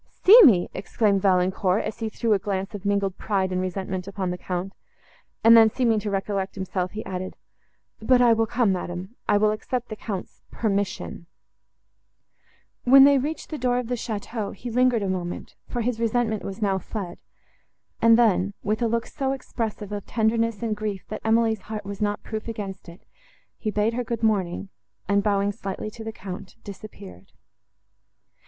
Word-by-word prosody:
"See 445 +6 +11
me!" 210 - +6
exclaimed 200 +1 +1
Valancourt, 185 +1 +2
as - - -5
he 225 -1 -2
threw 225 +1 0
a 200 - +2
glance 195 +1 -3
of 205 -1 -7
mingled 200 -2 0
pride 190 -3 0
and 185 0 0
resentment 185 0 -3
upon 195 -2 -3
the 180 - -4
Count; 185 +2 -4 0.7
and 230 +1 +8
then, 225 -1 +8
seeming 230 -2 +1
to 210 0 -4
recollect 195 -1 -2
himself, 185 -1 -3
he 215 - -6
added—"But 190 +6 -3
I 240 -2 +6
will 225 0 +1
come, 225 -4 +2
madam; 180 +4 -5
I 205 - +5
will 210 +1 +3
accept 245 +3 -3
the 215 - -5
Count's 200 -3 -6
permission." 200 -5 -2 1.6
When 270 +2 +8
they 280 0 +6
reached 300 +5 -4
the 310 - -4
door 245 0 +1
of 250 -2 -3
the - - 0
château, 220 -2 -4
he 240 - -7
lingered 250 -2 +3
a - - -1
moment, 180 -2 -4
for 240 - -3
his 235 0 -1
resentment 230 -2 0
was 195 +3 -5
now 195 -2 +1
fled; 190 -4 -6 0.8
and 230 0 +7
then, 200 -4 +2
with 215 +3 -1
a 235 - +3
look 230 +1 0
so 270 -2 -2
expressive 225 -5 -5
of 205 -1 -5
tenderness 230 0 0
and 220 -2 0
grief, 210 -2 -4
that 215 - -5
Emily's 225 -1 +2
heart 215 -2 -5
was 200 0 -6
not 205 0 -1
proof 220 0 -5
against 200 -5 -6
it, 170 - -14 0.5
he 215 - -2
bade 210 +2 +1
her 245 +1 -1
good 230 -1 -4
morning, 195 -3 0 0.4
and, 200 0 +3
bowing 200 -1 +1
slightly 200 +1 -5
to 225 - -9
the 220 - -4
Count, 195 -2 -8
disappeared. 100 - -11
210 Hz, 175 wpm, -25 LUFS, 195-230 Hz, 1.6 s, See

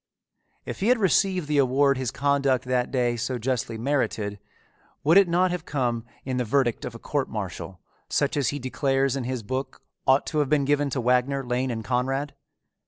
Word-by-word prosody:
If - - -6
he 200 - 0
had 250 +1 +5
received 190 -4 +2
the 150 -1 +2
award 140 +1 +3
his 130 -3 -1
conduct 140 -1 +1
that 125 -1 0
day 120 -2 +1
so 125 +2 -2
justly 120 -1 -2
merited, 110 -5 -1 0.6
would 160 +4 +4
it 200 -1 +7
not 180 +2 +2
have 180 -3 -3
come 120 -6 -1 0.2
in 130 -1 -2
the 125 - +1
verdict 120 0 +1
of 115 - -6
a - - -6
court 140 +3 -2
martial 95 -4 -6 0.3
such 145 -1 +1
as 145 -3 +1
he 145 - -3
declares 135 0 0
in 135 -3 -3
his 125 -2 -3
book 130 +5 -4 0.2
ought 135 +1 +4
to 155 - -1
have 145 -3 +1
been 145 -2 +2
given 145 0 +2
to 135 -1 -2
Wagner, 125 +3 +1
Lane, 125 +2 -1
and 110 -3 -4
Conrad? 135 +5 -1
130 Hz, 195 wpm, -25 LUFS, 125-145 Hz, 0.6 s, it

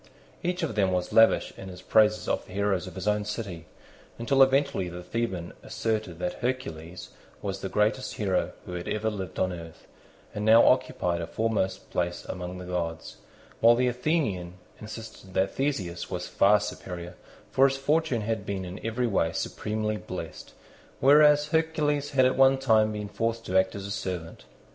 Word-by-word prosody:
Each 180 0 -2
of 155 - -1
them 100 -3 +2
was 90 -1 -1
lavish 115 0 +5
in 95 - -8
his 90 -1 -10
praises 110 0 +3
of - - -1
the - - -12
heroes 100 -3 0
of 95 - -9
his 95 +2 -5
own 105 0 +2
city, 100 -6 -5 0.5
until 135 +4 +2
eventually 135 -8 +3
the 90 +1 -8
Theban 95 -4 -3
asserted 110 -6 -2
that 90 0 -3
Hercules 90 -10 -4 0.3
was 95 -1 -3
the 95 - -3
greatest 110 +6 0
hero 95 -4 0
who 90 - -7
had 90 0 -5
ever 110 +1 -1
lived 95 -5 -6
on 95 -1 0
earth, 80 -2 -10 0.5
and 105 - -4
now 110 +2 +7
occupied 90 -9 +2
a 85 - -4
foremost 110 -4 -1
place 85 0 -2
among 90 0 -6
the 90 - -8
gods; 85 -2 -4 0.4
while 115 +1 +7
the 125 +1 +2
Athenian 120 - -1 0.2
insisted 110 -3 -10
that 95 +1 +1
Theseus 100 -12 -2
was - - -4
far 105 +2 +4
superior, 90 -4 -6 0.4
for 135 +1 +5
his 135 0 -2
fortune 145 -3 +1
had 110 -1 -2
been 95 -2 -4
in 90 +3 -8
every 115 +3 -1
way 95 -7 +1
supremely 105 +3 -2
blessed, 90 -5 -8 0.5
whereas 150 +1 +6
Hercules 150 -3 +1
had 130 -2 +3
at 130 - +2
one 135 0 +5
time 110 -5 +3
been 105 -1 -4
forced 115 +3 -2
to 95 - -3
act 95 +1 +3
as 100 -1 -6
a 100 - -5
servant. 90 -5 -5
105 Hz, 175 wpm, -27 LUFS, 90-125 Hz, 0.5 s, now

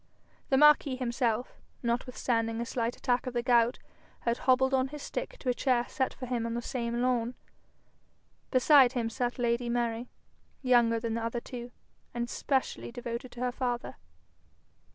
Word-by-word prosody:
The 265 - +4
marquis 295 -2 +6
himself, 245 -2 -1 0.2
notwithstanding 235 -1 -1
a 235 - -2
slight 235 -1 -2
attack 250 +1 0
of 255 - -4
the 240 - 0
gout, 240 -1 +3 0.4
had 235 0 0
hobbled 265 +1 +3
on 260 0 +3
his 295 +1 -8
stick - - -5
to 260 - -3
a - - +3
chair 245 -1 +1
set 260 - -1
for 255 - -7
him 240 -2 -2
on 230 - -3
the 240 - -2
same 235 -1 -2
lawn. 245 -1 0 1.1
Beside 260 -1 +6
him 230 -3 -1
sat 245 +2 -2
lady 240 0 0
Mary, 235 0 -1 0.5
younger 240 -3 +4
than 225 0 -3
the 230 0 -2
other 230 +1 -2
two, 240 0 -8 0.4
and 240 0 -1
specially 265 -3 -1
devoted 240 0 -5
to 245 - -8
her 250 0 0
father. 245 -1 -3
245 Hz, 165 wpm, -30 LUFS, 235-255 Hz, 1.1 s, marquis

